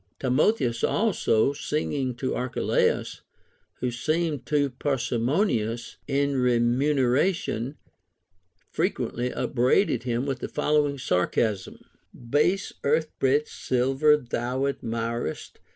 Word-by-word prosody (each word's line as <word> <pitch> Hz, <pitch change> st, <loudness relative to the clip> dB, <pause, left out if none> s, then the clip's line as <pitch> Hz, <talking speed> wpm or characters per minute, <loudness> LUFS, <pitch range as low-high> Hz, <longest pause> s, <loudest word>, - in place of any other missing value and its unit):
Timotheus 130 Hz, -, +1 dB
also, 140 Hz, -, +2 dB
singing 140 Hz, -3 st, -2 dB
to 130 Hz, +2 st, -2 dB
Archelaus 125 Hz, 0 st, 0 dB, 0.6 s
who 125 Hz, -, 0 dB
seemed 155 Hz, +2 st, -1 dB
too 145 Hz, -2 st, +1 dB
parsimonious 120 Hz, -, -1 dB
in 140 Hz, 0 st, +1 dB
remuneration, 125 Hz, -, +1 dB, 0.9 s
frequently 125 Hz, +1 st, -1 dB
upbraided 130 Hz, -, +1 dB
him 120 Hz, +1 st, -1 dB
with 135 Hz, -3 st, -2 dB
the -, -, -4 dB
following 150 Hz, -1 st, +1 dB
sarcasm: 100 Hz, -2 st, -1 dB, 0.3 s
— 120 Hz, -, -16 dB
Base 180 Hz, +7 st, +2 dB
earth 155 Hz, +2 st, +1 dB
bred 140 Hz, +3 st, +2 dB
silver 135 Hz, +4 st, +2 dB
tliou 125 Hz, +1 st, -2 dB
admirest. 115 Hz, -6 st, -4 dB
130 Hz, 95 wpm, -26 LUFS, 120-150 Hz, 0.9 s, also